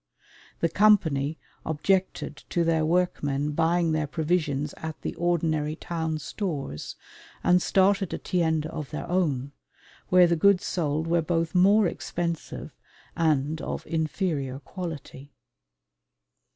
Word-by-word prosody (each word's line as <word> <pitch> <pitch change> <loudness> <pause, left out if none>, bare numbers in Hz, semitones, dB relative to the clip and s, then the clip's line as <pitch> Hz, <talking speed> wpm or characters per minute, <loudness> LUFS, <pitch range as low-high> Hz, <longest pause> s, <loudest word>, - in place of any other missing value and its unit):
The 165 - +2
Company 160 -9 +3 0.3
objected 185 +5 0
to 170 - +1
their 165 -1 +2
workmen 150 -4 0
buying 165 +2 +2
their 155 -1 0
provisions 150 -2 -1
at 160 -1 -6
the - - -2
ordinary 160 -3 0
town 160 -1 -3
stores 150 - -4 0.5
and 180 0 +4
started 195 0 +2
a - - -2
tienda 160 -3 0
of 155 -4 -5
their 150 - -5
own, 145 -7 0 0.6
where 180 0 +7
the 170 0 +2
goods 190 +2 +4
sold 155 -2 -1
were 170 +1 +2
both 165 0 -1
more 200 +4 +5
expensive 170 -2 -4 0.4
and 155 -1 +1
of - - -4
inferior 155 -4 -1
quality. 145 -4 -8
165 Hz, 120 wpm, -26 LUFS, 150-180 Hz, 0.6 s, where